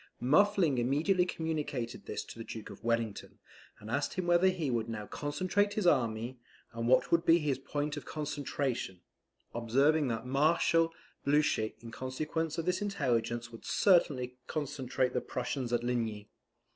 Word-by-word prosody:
Muffling 160 +1 +3
immediately 160 +9 +2
communicated 150 -8 -3
this - - -3
to - - -11
the - - -4
Duke 110 -1 -8
of - - -12
Wellington; 115 -2 -2 0.4
and 110 +1 -9
asked 140 +4 -1
him 185 - -2
whether 175 +1 +4
he 170 -7 0
would 115 -1 -1
now 105 -2 -4
concentrate 185 - -1
his 210 - 0
army, 120 -4 +1 0.3
and 115 0 -2
what 130 - +4
would 170 0 +4
be 165 0 +6
his 145 -5 -1
point 145 +2 -3
of - - -5
concentration; 140 - -3 0.5
observing 135 +6 +2
that 115 -1 -2
Marshal 165 +4 +3 0.3
Blucher 140 -6 +2
in 115 -1 -9
consequence 155 +6 -3
of 165 - -2
this 180 +2 0
intelligence 120 - -1
would 115 - -11
certainly 135 -10 +2
concentrate 135 -4 -1
the 125 - 0
Prussians 125 0 -3
at 120 -1 +1
Ligny. 115 -4 -2
135 Hz, 155 wpm, -32 LUFS, 120-160 Hz, 0.5 s, be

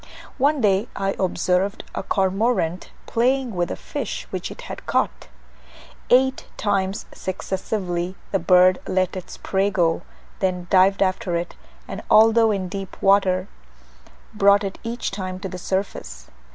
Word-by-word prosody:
One 285 +1 +3
day 200 +1 +2
I 195 0 -1
observed 185 +2 0
a - - -3
cormorant 190 -2 0 0.2
playing 250 +1 +1
with 175 -2 -1
a - - -3
fish - - -5
which - - -4
it - - -9
had - - -9
caught. - - 0 0.8
Eight 265 +1 +3
times 195 -1 -1
successively 185 -1 -3 0.2
the 195 - +2
bird 180 +1 +5
let 185 -1 0
its 185 - -7
prey 195 +1 0
go, 170 -4 +1 0.4
then 180 -2 -1
dived 195 +1 +5
after 185 -2 -1
it, 170 +1 -3 0.3
and - - -6
although 225 +1 +6
in 195 -3 -1
deep 195 +1 -7
water, 195 -1 +3 0.9
brought 200 0 +5
it 195 -1 -5
each 235 +1 -3
time 185 -2 -5
to 190 - -4
the 185 -1 -7
surface. 65 - -4
190 Hz, 140 wpm, -23 LUFS, 185-205 Hz, 0.9 s, although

